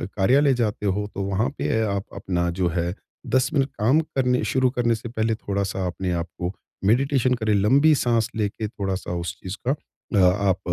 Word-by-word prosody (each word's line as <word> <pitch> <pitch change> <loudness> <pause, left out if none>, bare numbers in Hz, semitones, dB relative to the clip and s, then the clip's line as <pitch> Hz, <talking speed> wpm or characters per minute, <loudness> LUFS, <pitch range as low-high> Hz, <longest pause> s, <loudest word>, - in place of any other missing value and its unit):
कार्यालय 135 +8 +4
जाते 110 -4 -1
हो 100 +1 0
तो 100 - -2
वहाँ 100 +6 0
पे 110 - 0
आप 100 -1 -1
अपना 85 -2 -1
जो 90 - +3
है 85 +1 0 0.4
10 130 0 +3
मिनट 140 -2 +2
काम 130 +9 +4
करने 125 -5 0
शुरू 130 -1 +3
करने 120 -2 +1
से 115 +1 -7
पहले 110 -1 0
थोड़ा-सा 100 -2 -2
अपने 90 +1 -3
आपको 85 +1 -4 0.3
मेडिटेशन 130 +3 +3
करें, 110 -3 0
लंबी 135 +10 +5
साँस 115 -4 +1
लेके 105 0 -2
थोड़ा-सा 95 -3 -4
उस 85 +2 -4
चीज़ 95 +2 -6
का 135 - +3 0.4
अ, - - +4
आप 95 +1 +3
105 Hz, 180 wpm, -24 LUFS, 95-125 Hz, 0.4 s, लंबी